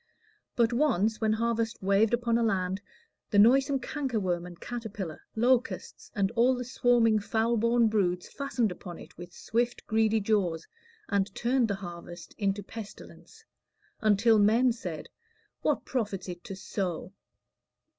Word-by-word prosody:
But 235 0 +2
once, 225 -6 +1
when 220 -1 +2
harvest 230 0 -1
waved 200 +3 +3
upon 235 -1 +1
a - - +1
land, 190 -3 0 0.5
The 205 - +1
noisome 270 +6 +5
cankerworm 215 - -2
and 175 -1 -12
caterpillar, 220 -8 -6
Locusts, 250 +2 0
and 200 -1 +1
all 240 +2 +3
the 250 0 -4
swarming 235 -3 +3
foul 225 +3 0
born 230 +1 +3
broods, 180 -5 0
Fastened 250 -7 -1
upon 180 -1 -8
it - - -13
with 175 0 -10
swift, 240 +6 -2
greedy 220 0 +2
jaws, 195 -6 0 0.4
And 200 -2 +1
turned 245 0 +2
the 200 - -1
harvest 175 -2 -9
into 200 0 0
pestilence, 225 - -11 0.5
Until 215 +1 +4
men 230 +5 +4
said, 180 -9 -6 0.5
What - - 0
profits 205 -8 -3
it 175 -1 -7
to 195 - -6
sow? 190 -1 -4
220 Hz, 140 wpm, -29 LUFS, 195-235 Hz, 0.5 s, noisome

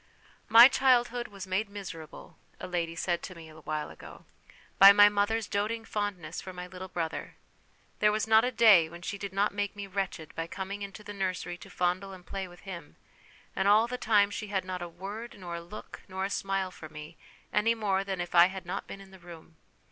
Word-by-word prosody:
" - - -31
My 235 +2 +13
childhood 245 -3 +2
was 200 -1 -9
made 195 +3 -1
miserable," 175 -6 -9 0.2
a - - -6
lady 170 -2 -2
said 170 0 -1
to 185 - -8
me 165 -1 -11
a 155 0 -13
while 155 0 -4
ago, - - -13 0.3
" - - -27
by 195 0 +11
my 205 0 +8
mother's 205 +2 0
doting 220 +3 -2
fondness 195 -7 -4
for 190 - -8
my 180 0 -7
little 185 +1 -8
brother; 165 -3 -4 0.6
there 210 - +4
was 215 +1 0
not 220 0 +5
a 250 - 0
day 205 -10 +6
when 170 +1 -11
she 200 +2 -4
did 200 -1 -5
not 200 +2 +1
make 205 0 -2
me 205 -1 -6
wretched 195 -4 -4
by 165 0 -4
coming 195 +3 -6
into 200 +1 -7
the 205 - -8
nursery 185 -2 -3
to - - -12
fondle 180 +2 -1
and 180 -1 -13
play 195 -1 -5
with 175 -1 -15
him, 170 -6 -9 0.6
and 190 - +1
all 210 +2 +6
the 245 +1 -4
time 210 -4 +3
she 215 +1 -5
had 195 -2 -2
not 185 -1 -5
a 175 - -5
word 200 +7 -8
nor 175 -3 -7
a - - -7
look 175 +5 -10
nor 190 0 -3
a 195 - -4
smile 195 -1 -1
for 155 -3 -11
me, 150 +2 -10 0.4
any 230 +2 +3
more 195 -3 0
than 195 -2 -4
if 175 0 -4
I 175 0 +8
had 190 -1 -7
not 185 +3 -5
been 195 - -9
in 195 -1 -15
the 190 - -14
room. 170 -2 -13
195 Hz, 225 wpm, -29 LUFS, 175-205 Hz, 0.6 s, My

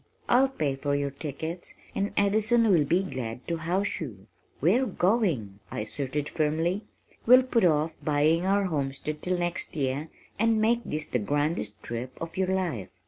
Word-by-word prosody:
I'll 265 +2 +5
pay 150 - -1
for 140 +1 -1
your 140 -1 -1
tickets 160 +5 -5 0.2
and 200 +1 -1
Addison 220 +3 +4
will 160 -6 +4
be 175 +6 +2
glad 125 -8 -5
to 170 - -1
house 180 +5 -1
you. 105 -11 -7 0.3
We're 225 - +3
going!" 175 - 0
I - - -4
asserted 140 +6 -3
firmly. 165 +6 0 0.4
"We'll 255 +2 +8
put 245 -4 +1
off 155 -1 +2
buying 155 +3 +3
our 200 +2 +2
homestead 150 -3 -2
till 180 0 0
next 175 -1 -2
year 140 +2 -1 0.3
and 225 0 +3
make 230 +2 +3
this 155 0 -3
the 125 - -1
grandest 145 -4 -1
trip 120 +2 -5
of 165 0 -6
your 190 0 +1
life." 180 - -1
160 Hz, 165 wpm, -27 LUFS, 140-195 Hz, 0.4 s, We'll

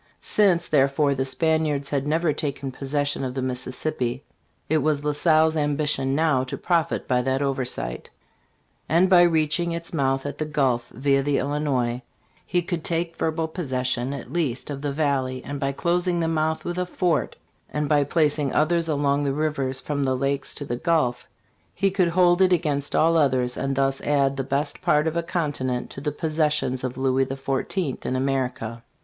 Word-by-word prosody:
Since, 185 -5 +3
therefore, 140 0 +3
the 130 -1 -1
Spaniards 150 -1 +1
had 140 0 -1
never 160 +1 +1
taken 140 -2 -3
possession 145 +1 -1
of 130 -1 -4
the 135 - -1
Mississippi, 125 0 -2 0.4
it 155 +1 +2
was 145 0 0
La 150 - +1
Salle's 155 +1 +3
ambition 145 -2 0
now 155 -4 +2
to 130 - -5
profit 170 -3 0
by 125 -3 +2
that 135 +2 0
oversight, 130 - -3 0.8
and 175 +5 +3
by 180 -1 +8
reaching 170 0 +2
its 170 0 -5
mouth 135 -3 0
at 145 - -5
the 155 - -1
Gulf 135 -6 0
via 135 +3 +1
the 140 0 +1
Illinois, 130 -4 -1 0.5
he 175 -1 +1
could 170 -2 -3
take 170 0 -1
verbal 160 0 -1
possession, 130 -6 -2
at 140 -3 -7
least, 150 -5 -2
of 140 -1 -5
the 145 -1 -2
valley, 135 -3 -1
and 145 0 -5
by 135 0 0
closing 175 +4 0
the 165 - 0
mouth 160 0 -1
with 175 +1 -3
a 180 - 0
fort 175 -3 0 0.3
and 150 0 -2
by 145 -1 +3
placing 145 -2 +1
others 165 +2 +2
along 145 -1 +1
the 140 -1 0
rivers 140 -3 -1
from 145 0 -2
the 130 -1 0
Lakes 140 +1 -1
to 145 - -4
the 120 -2 -3
Gulf, 125 -6 0 0.5
he 195 -1 +1
could 185 -2 +2
hold 175 +1 +3
it 185 -1 +5
against 150 -5 0
all 165 +1 +4
others, 130 -4 +2
and 135 0 -2
thus 135 0 +1
add 140 -2 +1
the 135 - -2
best 140 +2 -2
part 150 +1 +3
of 160 0 -1
a 170 - +1
continent 145 -8 -2
to 135 - -8
the 150 +1 -1
possessions 150 -4 0
of 130 0 -4
Louis 130 0 +1
XIV. 135 +3 -2
in 130 - -2
America. 130 -4 -2
145 Hz, 180 wpm, -24 LUFS, 135-160 Hz, 0.8 s, by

